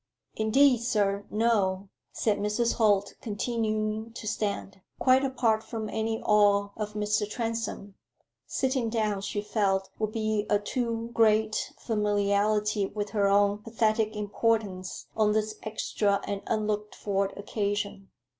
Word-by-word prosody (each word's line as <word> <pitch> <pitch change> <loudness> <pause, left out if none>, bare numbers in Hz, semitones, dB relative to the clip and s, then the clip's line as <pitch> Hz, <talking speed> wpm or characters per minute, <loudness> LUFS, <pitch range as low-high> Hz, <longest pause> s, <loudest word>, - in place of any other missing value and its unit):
"Indeed, 250 +4 +4
sir, 205 -4 0
no," 200 -4 +1 0.2
said 210 -2 0
Mrs. 210 +3 +1
Holt, 205 -3 +3
continuing 215 0 -2
to 230 - -8
stand. 200 -3 -3 0.2
Quite 260 +1 +4
apart 240 -5 +1
from 220 -1 -5
any 220 +1 -2
awe 205 -1 +4
of 210 -1 -4
Mr. 210 0 0
Transome 225 -3 -3 0.5
sitting 260 -3 0
down, 215 -3 0
she 205 +1 -3
felt, 195 -2 0
would 215 -1 -1
be 215 -1 -1
a 205 - +4
too 230 +1 -3
great 220 -1 +2
familiarity 210 -1 +1
with 205 0 -4
her 205 -2 +2
own 200 +1 +3
pathetic 220 -1 0
importance 205 -3 -1
on 215 -1 +3
this 215 0 0
extra 210 -2 0
and 200 -1 -3
unlooked 210 -1 -1
for 200 -1 0
occasion. 200 -1 -3
210 Hz, 125 wpm, -28 LUFS, 205-225 Hz, 0.5 s, Indeed